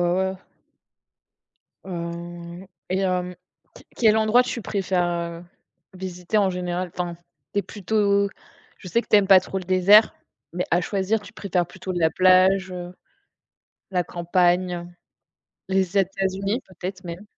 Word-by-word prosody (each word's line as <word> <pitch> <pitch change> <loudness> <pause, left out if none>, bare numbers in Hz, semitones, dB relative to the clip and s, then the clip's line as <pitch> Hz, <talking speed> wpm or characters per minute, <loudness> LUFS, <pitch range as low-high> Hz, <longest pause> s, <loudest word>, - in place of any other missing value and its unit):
ouais. 190 0 -1 1.5
Heu 170 0 -7 0.2
et 185 +1 0
hem, 180 -1 -1 0.4
q - - -14
quel 220 -2 +4
endroit 220 +3 +4
tu 245 -2 -4
préfères, 190 -3 0
heu, 170 0 -4 0.5
visiter 185 +2 -3
en 195 -2 +3
général? 180 -1 -3
Enfin, 175 -1 -3 0.4
tu 200 - +2
es - - 0
plutôt 200 0 +1 0.5
je 185 - -11
sais 235 +6 +1
que - - -19
tu - - +6
aimes 200 -2 +4
pas 190 -2 +8
trop 190 +1 -5
le 185 - -4
désert, 185 +4 +5 0.4
mais 180 - -2
à 175 +1 +3
choisir, 200 +3 0
tu 200 - -13
préfères 180 -3 -1
plutôt 190 0 -6
de 175 - -2
la 160 -1 +4
plage, 185 +1 +4
heu, 180 0 -7 1.0
la 180 -2 0
campagne, 175 0 0 0.8
les 190 0 0
États-Unis 195 +4 0
peut-être 185 0 -7
même? 175 +4 -8
185 Hz, 145 wpm, -23 LUFS, 175-195 Hz, 1.5 s, pas